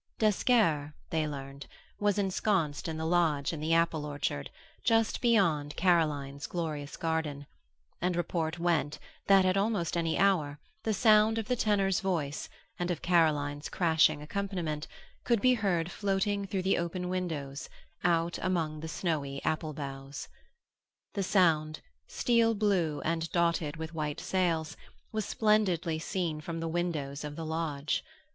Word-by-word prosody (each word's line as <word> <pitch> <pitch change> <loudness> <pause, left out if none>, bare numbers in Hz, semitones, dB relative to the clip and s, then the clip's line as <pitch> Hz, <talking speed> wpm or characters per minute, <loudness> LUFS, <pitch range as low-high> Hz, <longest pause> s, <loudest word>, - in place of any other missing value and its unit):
D'Esquerre, 200 - +2 0.2
they 160 -1 +1
learned, 140 -1 -7 0.3
was 205 -1 +2
ensconced 190 -5 0
in 160 -1 -3
the 160 - -3
lodge 160 -4 +2
in 160 - -4
the 160 +2 +1
apple 165 -2 +2
orchard, 145 - -3 0.3
just 225 -1 +2
beyond 170 - +2
Caroline's 150 -6 +1
glorious 155 -4 -4
garden, 160 -3 -2 0.6
and 180 0 +1
report 170 -1 -1
went 170 -4 0 0.3
that 195 -1 +6
at 185 +1 +2
almost 200 -5 0
any 165 -1 0
hour 160 -7 +2 0.2
the 220 - 0
sound 215 +1 +5
of 220 -2 -2
the 250 - +1
tenor's 200 -5 +2
voice 160 -7 -2 0.3
and 175 0 -1
of 175 - -3
Caroline's 150 -4 +2
crashing 160 -3 +3
accompaniment 170 -4 -3 0.4
could 235 -3 +2
be 255 +4 +5
heard 190 -7 0
floating 200 0 0
through 190 -1 -2
the 190 - +2
open 180 +1 -3
windows, 160 -7 -3 0.3
out 170 0 +1
among 165 -5 -1
the 160 - -6
snowy 155 -4 -2
apple 155 0 -1
boughs. 140 -1 -7 0.9
The 200 - -1
Sound, 160 -5 +2 0.3
steel 230 -2 +2
blue 190 -8 +1
and 165 0 -1
dotted 170 -3 +1
with 160 +1 -6
white 150 -2 -3
sails, 170 -3 0 0.4
was 215 -2 -2
splendidly 190 -8 +1
seen 160 -2 -2
from 165 +1 -5
the 165 - -2
windows 160 -4 -2
of 150 0 -5
the 165 0 -5
lodge. 155 -2 -2
165 Hz, 145 wpm, -30 LUFS, 150-190 Hz, 0.9 s, that